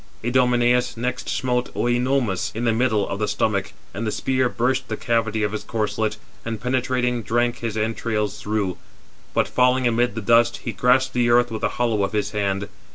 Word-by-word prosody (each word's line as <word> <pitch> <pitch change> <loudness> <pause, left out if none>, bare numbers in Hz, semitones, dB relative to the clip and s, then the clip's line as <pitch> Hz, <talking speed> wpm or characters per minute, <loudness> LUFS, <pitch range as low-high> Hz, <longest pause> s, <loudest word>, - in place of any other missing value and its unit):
Idomeneus 125 0 +2
next 125 +1 -3
smote 125 -1 -1
Œnomaus 120 -4 0
in 115 +2 -2
the 115 - +3
middle 110 -3 +1
of 95 - -4
the 105 - 0
stomach, - - 0 0.2
and 110 +4 -3
the - - 0
spear 130 +1 0
burst 130 +3 0
the 110 - -3
cavity 110 -2 0
of 105 - 0
his 110 - -4
corslet, 105 -1 -1 0.3
and 115 -2 -4
penetrating, 125 0 0
drank 120 +2 0
his 115 -2 -3
entrails 105 -1 -2
through; 105 -4 -1 0.6
but - - +2
falling 125 0 +2
amid 120 -2 +1
the 115 - -3
dust, 115 +2 +4
he - - -2
grasped 130 +1 +2
the 120 -1 +2
earth 120 0 +4
with 110 - -4
the - - +1
hollow 115 -4 +1
of 100 - -2
his 105 -1 -1
hand. 100 -1 -1
120 Hz, 185 wpm, -22 LUFS, 110-125 Hz, 0.6 s, dust